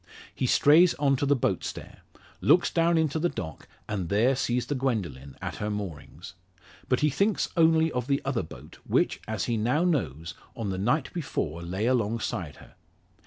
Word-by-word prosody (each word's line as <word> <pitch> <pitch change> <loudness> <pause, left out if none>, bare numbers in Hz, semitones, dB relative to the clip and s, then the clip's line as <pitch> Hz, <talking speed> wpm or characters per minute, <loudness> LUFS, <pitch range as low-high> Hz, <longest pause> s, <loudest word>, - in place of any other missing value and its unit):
He 130 - -1
strays 165 +8 +5
on 140 -1 +2
to 140 - -1
the 145 - +4
boat 125 - 0
stair, - - -7 0.4
looks 175 - +4
down 170 0 +3
into 160 -1 +1
the 175 +2 +1
dock, 80 - -7 0.2
and 95 -6 -3
there 115 +8 +3
sees 125 -1 0
the 145 - -2
Gwendoline 100 - -3
at - - -4
her 105 - -3
moorings. 100 -9 -6 0.6
But 125 - +2
he 150 -1 +3
thinks 200 +7 +1
only 160 -1 +4
of 125 -2 -3
the 140 -1 +2
other 135 -4 0
boat, 80 - -12
which, - - +1
as 110 -3 -2
he 120 -2 -1
now 125 +9 +1
knows, 85 - -1 0.2
on 110 -6 -3
the 95 - -3
night 125 +8 0
before 85 - -3
lay 95 +5 -3
alongside 115 - -1
her. - - -16
125 Hz, 180 wpm, -27 LUFS, 100-150 Hz, 0.6 s, strays